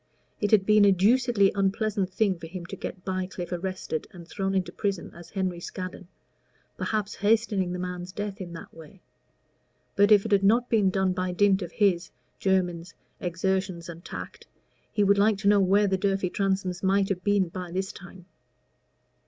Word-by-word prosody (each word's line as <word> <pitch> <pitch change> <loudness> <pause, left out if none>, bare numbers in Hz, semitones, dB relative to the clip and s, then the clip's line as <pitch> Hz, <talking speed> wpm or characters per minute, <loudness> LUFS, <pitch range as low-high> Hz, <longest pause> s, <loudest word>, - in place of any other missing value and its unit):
It 205 - 0
had 205 -3 +4
been 210 0 +5
a 200 - +6
deucedly 210 +1 +3
unpleasant 200 0 0
thing 190 -3 +1
for 165 - -8
him 175 +1 -7
to - - -7
get 180 - -7
Bycliffe 185 -2 -4
arrested 180 -3 -3
and 170 -2 -12
thrown 195 +1 -2
into 190 -1 0
prison 200 -5 -3
as 170 0 -12
Henry 185 -3 -2
Scaddon 185 +1 -7 0.7
perhaps 210 -1 -2
hastening 205 -3 +1
the 180 - -3
man's 180 0 -5
death 205 0 -5
in 175 -2 -6
that 165 - -10
way. 170 +4 -14 0.9
But 205 +2 +4
if 205 -1 +6
it 220 - -4
had 200 -1 +4
not 235 +5 +3
been 210 -4 +4
done 190 0 +1
by 185 0 -2
dint 200 +1 +3
of 175 -2 -6
his 185 -4 +2 0.3
(Jermyn's) 180 -2 0 0.2
exertions 180 0 -2
and 170 0 -9
tact, - - -8 0.4
he 210 - +1
would 200 0 +4
like 210 0 +4
to 200 0 -2
know 205 0 +6
where 195 +2 +4
the 190 -1 0
Durfey 195 -2 0
Transomes 190 -2 -1
might 195 +1 +2
have 180 -2 -2
been 200 -3 +2
by 180 0 -6
this 190 +2 -2
time. 180 0 -13
190 Hz, 180 wpm, -27 LUFS, 180-200 Hz, 0.9 s, a